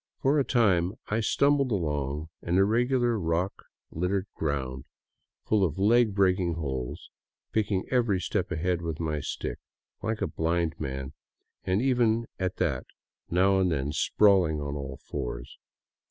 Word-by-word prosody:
For 140 +3 +2
a - - +3
time 95 -9 +2 0.2
I 105 - +1
stumbled 140 +3 +2
along 75 -4 -2
an 85 +2 0
irregular, 120 +3 +2
rock 85 +2 0 0.4
littered 90 +3 -1
ground, 65 -4 -3 0.6
full 105 -2 +2
of 80 -3 0
leg 110 +1 +4
breaking 90 -3 +2
holes, 65 -6 -4 0.4
picking 100 -3 0
every 120 -7 +2
step 90 -1 -2
ahead 90 +1 0
with 80 -2 -4
my 80 -2 -1
stick, 65 -3 -4 0.4
Hke 110 0 -2
a - - +3
blind 85 0 0
man, 65 -2 -4 0.5
and 95 +5 +1
even 120 -3 +2
at 95 -1 -1
that 65 -6 -1 0.4
now 95 +2 +3
and 90 -2 +2
then 70 -2 -1
sprawling 90 -1 +3
on 70 -1 -4
all 70 -2 -5
fours. - - -6
90 Hz, 140 wpm, -28 LUFS, 75-105 Hz, 0.6 s, leg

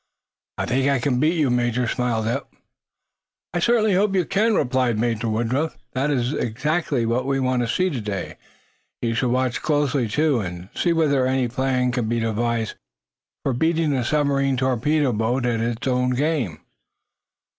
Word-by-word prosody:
"I - - -1
think 135 +3 +1
I 140 - +3
can 125 0 0
beat 155 +5 +2
you, 150 -6 +2
Major," 120 0 +1
smiled 120 -3 -1
Eph. 115 - -1 1.1
"I 175 - 0
certainly 220 +1 +3
hope 195 +1 +2
you 180 -3 +2
can," 215 +5 +2
replied 125 - +1
Major 115 0 0
Woodruff. 120 +8 -1 0.2
"That 135 +3 0
is 130 -1 0 0.7
what 120 +3 0
we 135 0 +1
want 130 -1 +1
to 120 - -1
see 185 +8 +1
today. 105 -8 -4 0.7
We 115 -1 +1
shall 125 +2 0
watch 130 0 0
closely, 145 -4 +1
too, 145 +3 +1
and 90 -2 -6
see 175 - +1
whether 145 -6 +2
any 130 -1 +1
plan 125 +1 0
can 120 -3 -1
be 115 0 0
devised 115 0 -1 0.7
for 135 - 0
beating 160 +3 +1
a 130 -2 0
submarine 140 -1 +1
torpedo 130 +2 +1
boat 115 +4 0
at 120 -2 0
its 115 +1 -2
own 125 0 +1
game." 135 - -1
125 Hz, 165 wpm, -23 LUFS, 120-145 Hz, 1.1 s, I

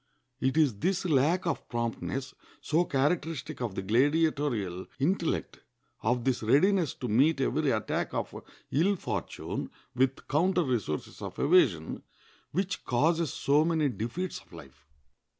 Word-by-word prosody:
It 130 +3 0
is 140 -10 +3
this 190 - 0
lack 160 +3 +2
of 170 - -2
promptness, 120 +3 -3 0.3
so 165 +3 +1
characteristic 145 -1 -1
of 115 -6 -3
the 95 - -3
gladiatorial 125 - +1
intellect, 170 +4 -1 0.4
of 120 +2 +1
this 130 -1 0
readiness 160 - +3
to 125 - -5
meet 135 +8 +3
every 140 +2 +1
attack 110 -4 -1
of - - -3 0.4
ill 180 +8 +3
fortune - - -4 0.2
with 130 +1 0
counter 175 +4 +2
resources 115 - -3
of - - -6
evasion, 135 - +3 0.5
which 185 +3 -2
causes 160 +5 +1
so 145 +2 +3
many 160 -3 +2
defeats 120 - -4
of - - -25
life. 70 +2 -14
140 Hz, 130 wpm, -29 LUFS, 120-165 Hz, 0.5 s, is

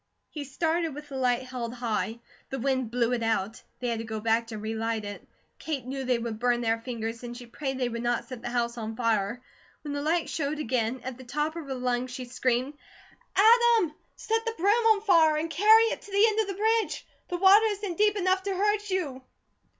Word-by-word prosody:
He 295 -2 -5
started 325 +2 -1
with 295 0 -9
the 275 - -7
light 250 -1 +1
held 250 -2 -5
high. 230 -1 -2 0.3
The 270 - -3
wind 260 -2 0
blew 240 0 +1
it 240 - -1
out. 225 -1 -1 0.2
They 245 - -2
had 230 -1 -1
to - - -4
go 220 -1 -4
back 225 +1 +1
to 225 -2 -6
relight 220 0 -2
it. 205 0 -8 0.3
Kate 290 -6 -4
knew 265 +1 -4
they 250 -1 +1
would 230 -2 -4
burn 245 0 +2
their 225 -1 0
fingers, 230 -1 -5
and 240 -1 -7
she 245 - -9
prayed 265 +3 -4
they 255 -1 0
would 235 -1 -4
not 240 0 0
set 255 -3 -8
the - - -4
house 240 0 -1
on 220 0 -5
fire. 225 0 0 0.4
When 295 -2 -4
the 285 - -2
light 325 +3 +1
showed 300 0 -2
again, 250 -3 -1
at 260 -1 -6
the - - -9
top 300 +5 -2
of 335 -3 -6
her 265 - -3
lungs 250 0 -1
she 250 +1 -6
screamed: 255 +2 -1 0.6
"Adam, 450 -4 +5 0.2
set 450 +1 -1
the 455 -1 -3
broom 390 +5 +3 0.2
on 435 -2 +4
fire 330 -7 +5
and 325 +2 -2
carry 430 +8 +6
it - - -4
to 420 -5 -13
the 400 +3 +5
end 430 0 -1
of 435 - +1
the 395 - -3
bridge; 445 +2 0 0.2
the 355 - -2
water 395 +4 +7
isn't 405 -4 -3
deep 420 -1 +4
enough 375 0 +2
to 390 0 -2
hurt 415 +2 0
you." 310 -9 -2
260 Hz, 225 wpm, -27 LUFS, 235-355 Hz, 0.6 s, water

